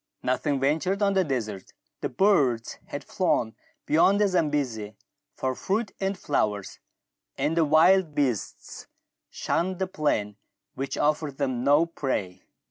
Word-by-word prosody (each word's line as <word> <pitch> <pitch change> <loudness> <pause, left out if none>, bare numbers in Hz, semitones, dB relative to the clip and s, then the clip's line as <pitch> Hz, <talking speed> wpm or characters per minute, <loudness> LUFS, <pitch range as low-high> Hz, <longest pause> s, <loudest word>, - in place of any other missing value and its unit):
Nothing 140 +2 0
ventured 160 +9 0
on 200 -1 +3
the 190 -1 +3
desert; 110 - -4 0.3
the - - -3
birds 140 - +2
had - - -6
flown 110 -2 0 0.3
beyond 185 +6 +4
the 210 - +4
Zambesi 140 - -1 0.4
for 130 0 -1
fruit 205 - -2
and 195 0 -1
flowers, 105 -8 -2 0.6
and 160 - 0
the 165 -2 +3
wild 160 +2 +4
beasts 125 -8 -3 0.4
shunned 185 +2 -1
the 190 - 0
plain 110 - -1 0.4
which 135 0 -4
offered 150 -2 0
them 130 -4 -1
no 145 +4 +4
prey. 105 - -3
145 Hz, 130 wpm, -26 LUFS, 125-185 Hz, 0.6 s, beyond